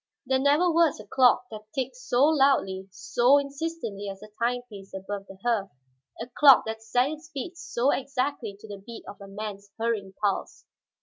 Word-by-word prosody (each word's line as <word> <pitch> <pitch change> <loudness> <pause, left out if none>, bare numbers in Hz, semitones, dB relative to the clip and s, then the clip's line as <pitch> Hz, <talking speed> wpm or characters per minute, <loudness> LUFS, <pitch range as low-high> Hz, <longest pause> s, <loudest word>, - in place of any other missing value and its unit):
There 265 0 +2
never 290 +6 +4
was 330 -2 +3
a - - -10
clock 250 -1 +4
that 215 0 -10
ticked 260 -1 -2
so 250 0 +1
loudly, 270 -11 +3
so 245 +7 +3
insistently 280 -8 -4
as 195 0 -8
the 210 0 -12
timepiece 235 -5 -3
above 195 +1 -6
the 195 - -12
hearth, 225 -5 +1 0.5
a 230 - -4
clock 270 +2 +6
that 220 0 -5
set 245 +4 +1
its 310 +2 -9
beats 330 +4 -6
so 260 -3 +1
exactly 265 -5 -2
to - - -11
the 205 -1 -8
beat 235 +1 -9
of 200 - -10
a 200 - -9
man's 200 0 -7
hurrying 225 -4 -2
pulse. 200 -2 -2
240 Hz, 180 wpm, -27 LUFS, 205-275 Hz, 0.5 s, clock